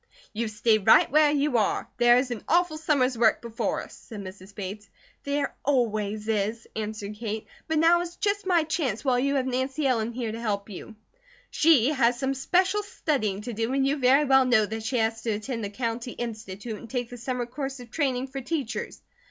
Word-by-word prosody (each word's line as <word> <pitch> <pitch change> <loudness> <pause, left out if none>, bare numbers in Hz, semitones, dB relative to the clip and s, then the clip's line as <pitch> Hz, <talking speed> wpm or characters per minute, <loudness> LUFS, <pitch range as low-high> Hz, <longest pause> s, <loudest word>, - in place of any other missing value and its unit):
"You 225 +2 -2
stay 220 0 +2
right 215 +4 +5
where 305 +1 +5
you 290 -4 +2
are. 210 - 0
There 240 0 +6
is 255 0 0
an 235 - -5
awful 345 -2 +2
summer's 275 -5 +2
work 225 -2 +4
before 235 0 -3
us," - - -13
said 215 -4 -10
Mrs. 190 +1 -11
Bates. 200 +1 -7 0.4
"There 280 0 -1
always 215 -6 0
is," 220 +1 -1
answered 215 -1 -4
Kate. 220 -1 -4 0.2
"But 320 - 0
now 335 +2 +5
is 350 0 -6
just 405 -1 -1
my 345 -4 +4
chance 295 - -2
while 250 -2 +3
you 280 +2 +1
have 265 -2 +1
Nancy 260 +3 -1
Ellen 235 -3 +1
here 235 -2 -3
to 225 +1 -6
help 205 -2 -2
you." 220 +4 -9 0.6
"She 295 -6 +4
has 245 -5 +2
some 265 +2 -1
special 370 +9 +1
studying 265 - -2
to 240 +2 -6
do, 225 +3 -1
and 270 0 +2
you 280 +2 +1
very 270 +2 +4
well 265 -1 +5
know 230 -4 +4
that 220 +2 -5
she 235 +4 -1
has 225 0 0
to 225 -1 -1
attend 225 +2 -4
the 200 - -3
County 230 +2 -3
Institute, 220 -2 -6
and 230 - -11
take 245 -2 -3
the 245 - -7
summer 245 +1 -3
course 270 +2 -5
of 240 -2 -12
training 265 -4 0
for 270 +1 -5
teachers." 255 -6 -4
245 Hz, 205 wpm, -26 LUFS, 220-275 Hz, 0.6 s, There